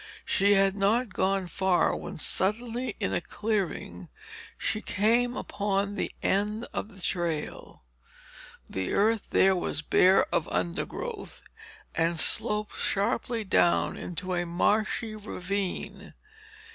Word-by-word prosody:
She 200 +1 +3
had 195 0 +4
not 205 +2 +1
gone 195 0 +1
far, 185 0 +2
when - - -6
suddenly 230 +9 0
in - - -1
a - - 0
clearing 185 - -3 0.5
she 215 - -1
came 235 +5 +1
upon 200 0 -1
the - - -2
end 210 +4 0
of - - -3
the 200 -3 -15
trail. 170 - -3 0.8
The 95 -1 -3
earth 220 +1 +2
here 190 0 +5
was 165 -3 -2
bare 185 +4 +5
of 165 - +1
undergrowth 325 - -3 0.5
and 165 0 +1
sloped 210 +6 0
sharply 225 +2 0
down 180 -3 +2
into 180 +2 -4
a 175 0 0
marshy 215 +5 0
ravine. 200 -2 -4
195 Hz, 120 wpm, -28 LUFS, 180-215 Hz, 0.8 s, here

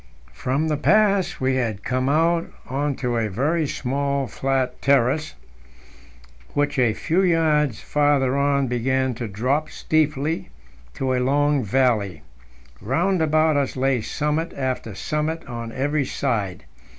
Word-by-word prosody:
From 135 - -1
the 155 -1 0
pass 200 +2 +2
we 130 0 +1
had 110 -5 -2
come 130 +1 0
out 165 +3 +2 0.2
on 140 +2 -1
to 125 -2 -2
a 110 -2 0
very 150 - 0
small 140 +1 -1
flat 130 -1 -2
terrace, 140 +3 +2 1.2
which 145 -1 +1
a 115 -4 +3
few 170 +3 +1
yards 155 - +2
farther 145 -3 +2
on 140 0 +2
began 130 +1 0
to 120 0 -5
drop 130 +10 -1
steeply 155 - 0 0.5
to 130 -1 -1
a 125 - +1
long 145 +1 +2
valley. 105 - +1 0.6
Round 170 - +1
about 155 -1 +3
us 140 -2 -1
lay 130 -2 +1
summit 150 +7 -2
after 130 -6 -3
summit 155 +7 -2
on 115 -3 -6
every 140 +3 0
side. 100 -9 -2
140 Hz, 135 wpm, -23 LUFS, 125-150 Hz, 1.2 s, a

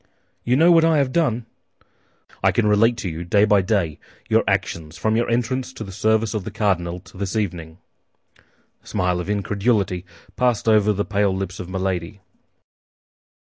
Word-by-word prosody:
"You 125 - +2
know 165 +5 +5
what 165 -1 +6
I 165 -1 +4
have 135 -3 +1
done?" 125 -8 0 1.0
"I - - +5
can 115 - +1
relate 110 +3 +3
to 105 - -4
you, 85 0 -5
day 100 +4 +3
by 105 -1 +4
day, 95 -6 -1 0.3
your - - +3
actions 80 -1 -2
from 110 0 0
your 120 +1 0
entrance 125 +2 -1
to 115 - -7
the 100 - -9
service 110 +2 +1
of 105 -3 -3
the - - -5
cardinal 95 -5 -1
to 95 - -15
this 100 +1 -3
evening." 85 -6 -3 1.1
A - - -21
smile 90 -1 0
of 90 - -5
incredulity 100 -2 0 0.3
passed 125 -3 +1
over 105 -1 +4
the 105 0 -1
pale 100 -2 +1
lips 95 0 -5
of 90 - -7
Milady. 95 0 -3
105 Hz, 175 wpm, -22 LUFS, 90-115 Hz, 1.1 s, what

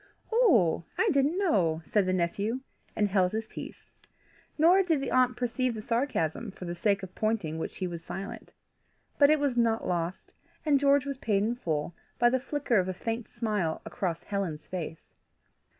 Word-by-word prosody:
"Oh! 255 - +4
I 445 - +3
didn't 285 +4 +2
know," 175 - +2
said 205 -3 +1
the - - +2
nephew, 200 +7 -1 0.3
and 210 - +2
held 185 -1 +2
his 220 0 -2
peace. - - -10 0.7
Nor 345 +5 +6
did 330 -6 +1
the 275 - -3
aunt 255 -1 +3
perceive 250 0 -1
the 215 - -5
sarcasm 230 - -1
for 190 -1 -9
the 175 - -3
sake 200 +2 +1
of 185 -1 -8
pointing 210 -8 -1
which - - -4
he 185 - -2
was 170 -2 -5
silent. 195 +4 -7 0.7
But 285 -1 +7
it 310 0 +4
was 285 -3 0
not 230 -1 +1
lost, 175 0 -2 0.3
and 290 -2 +4
George 280 0 +4
was 275 -2 -4
paid 205 -5 +1
in 225 +3 +1
full 160 -8 -2 0.2
by 240 0 +4
the 260 - +2
flicker 270 -4 0
of 185 - 0
a 185 - -3
faint 225 +4 -4
smile 210 -9 -1
across 175 -4 -3
Helen's 190 -7 -3
face. 165 -3 -6
220 Hz, 180 wpm, -29 LUFS, 180-260 Hz, 0.7 s, But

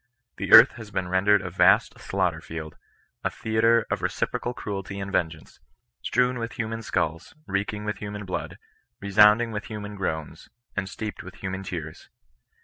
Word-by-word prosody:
The - - -4
earth 115 +4 +10
has 110 -3 -9
been 95 -3 -3
rendered 100 +2 +3
a 90 - -5
vast 90 - +4
slaughter 90 -4 -1
field 80 -2 -7 0.2
— - - -41
a - - +1
theatre 110 0 +2
of - - 0
reci - - -1
procal 120 0 -4
cruelty 100 -1 -5
and 100 0 -5
vengeance 80 -4 -2 0.2
— - - -54
strewn 125 0 +1
with 115 0 -4
human 115 -1 -4
skulls, 85 - -2
reeking 100 +1 -2
with 105 -1 -2
human 105 0 -6
blood, 90 - -4 0.4
resounding 105 +3 +5
with 105 -1 -4
hu 110 -2 -6
man 105 0 -7
groans, 80 -6 -4 0.3
and 100 -2 -2
steeped 105 +2 -6
with - - -11
human 95 0 -5
tears. 85 -5 -7
100 Hz, 175 wpm, -25 LUFS, 95-110 Hz, 0.4 s, earth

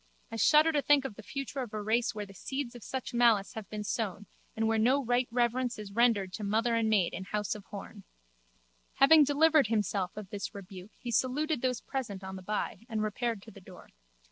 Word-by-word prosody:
I - - -5
shudder 305 +6 +5
to 295 -2 +1
think 285 -1 +4
of 270 - -4
the 220 - -11
future 275 +4 -5
of 240 -5 -5
a - - -2
race 230 +2 +1
where 210 -1 -4
the 195 - -14
seeds 265 +5 -4
of 240 -3 -11
such 260 -2 -5
malice 230 -4 +3
have 220 -2 -7
been 210 -1 -5
sown 205 -2 -3 0.3
and 225 0 0
where 225 0 +2
no 260 +5 +3
right 245 +1 +2
reverence 245 +1 0
is 210 -2 -8
rendered 205 -4 +2
to 215 - -5
mother 225 +4 +1
and 225 -1 +2
maid 200 -5 +2
in 190 +2 -5
house 210 +1 -2
of 210 -2 -10
Horne. 205 0 -9 0.9
Having 300 +2 +7
delivered 300 -1 +4
himself 205 -3 -1
of 205 -3 -8
this 205 +1 -5
rebuke 190 0 -9
he 240 - -6
saluted 265 +4 0
those 250 -3 0
present 215 -8 -5
on 190 0 -6
the 190 - -8
by 210 +3 -4
and 220 -2 -1
repaired 215 0 -2
to 225 - -12
the 200 - -14
door. 180 -1 -14
225 Hz, 220 wpm, -30 LUFS, 205-255 Hz, 0.9 s, Having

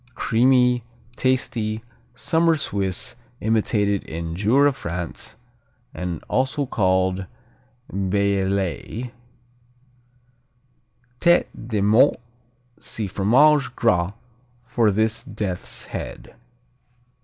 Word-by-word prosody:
Creamy, 125 0 +3 0.3
tasty, 115 -4 0 0.3
summer 165 +2 +2
Swiss, 100 -6 -1 0.2
imitated 105 -2 +1
in 80 +1 -5
Jura, 130 +9 +3
France, 85 - -6 0.6
and 90 -3 -4
also 135 +3 0
called 95 -4 +1 0.7
Bellelay. 100 +3 -1 2.1
Tête 175 0 +4 0.2
de 110 -4 -1
Mort 110 +8 +4 0.6
see 110 - -3
Fromage 130 +9 +3
Gras 90 +1 +2 0.5
for 115 -2 +2
this 110 +3 +1
death's 100 -4 -4
head. - - -7
105 Hz, 75 wpm, -23 LUFS, 95-125 Hz, 2.1 s, Tête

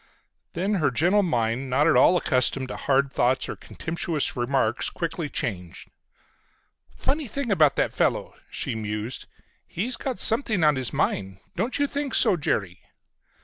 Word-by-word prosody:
Then 190 +5 -1
her 145 - +3
gentle 175 - +3
mind, 125 - -1
not 135 +4 +2
at - - +4
all 155 +8 +6
accustomed 130 -3 +1
to - - -5
hard 140 0 +1
thoughts 130 +2 +1
or - - -5
contemptuous 165 -2 -3
remarks, 120 -1 0
quickly 165 -2 -4
changed. 90 -10 -5 1.1
"Funny 290 +1 -1
thing 240 +1 -3
about 155 -7 +4
that - - 0
fellow," - - 0 0.2
she - - -3
mused. 105 +2 -4 0.4
"He's 235 +8 -1
got 260 -3 -4
something 225 - +2
on 150 -1 +5
his 130 -2 -2
mind. 95 -1 -1 0.2
Don't 240 +4 -1
you 285 - +2
think 285 0 -3
so, 215 -5 +5
Jerry?" 100 - -2
145 Hz, 150 wpm, -25 LUFS, 120-200 Hz, 1.1 s, all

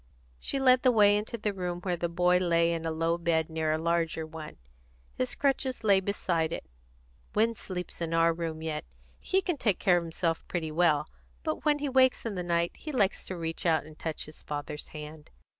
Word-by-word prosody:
She 275 - -2
led 255 -1 +5
the 255 - +5
way 205 -3 +6
into 210 +3 -2
the 210 -1 -1
room 180 -2 -3
where 180 -1 -1
the 170 0 -2
boy 180 +1 +3
lay 170 -1 +3
in 165 -1 -3
a - - -1
low 165 +1 0
bed 165 -1 +1
near 160 -1 0
a 155 - +2
larger 165 -1 0
one. 155 -1 -9 0.6
His 125 - -2
crutches 265 -3 0
lay 200 -3 +5
beside 175 -4 0
it. - - -4 0.7
"Win 225 +2 +3
sleeps 180 -5 -6
in 165 -1 -2
our 165 0 +4
room 165 -1 -4
yet. 155 -1 -3 0.4
He 380 0 +1
can 350 -5 -1
take 210 -8 +1
care 180 -2 +4
of 175 - -1
himself 165 0 -1
quite 160 -3 -3
well. 155 -3 +3 0.4
But - - -3
when 300 -1 +4
he 290 0 -2
wakes 260 -2 +3
in 225 - -2
the 180 - -3
night 170 -1 +1
he 310 - -6
likes 205 -8 +1
to 185 - -5
reach 165 +1 -4
out 165 -3 +3
and 155 0 -12
touch 160 -2 -3
his 155 - -11
father's 150 0 -5
hand." 150 0 -9
170 Hz, 210 wpm, -29 LUFS, 160-205 Hz, 0.7 s, way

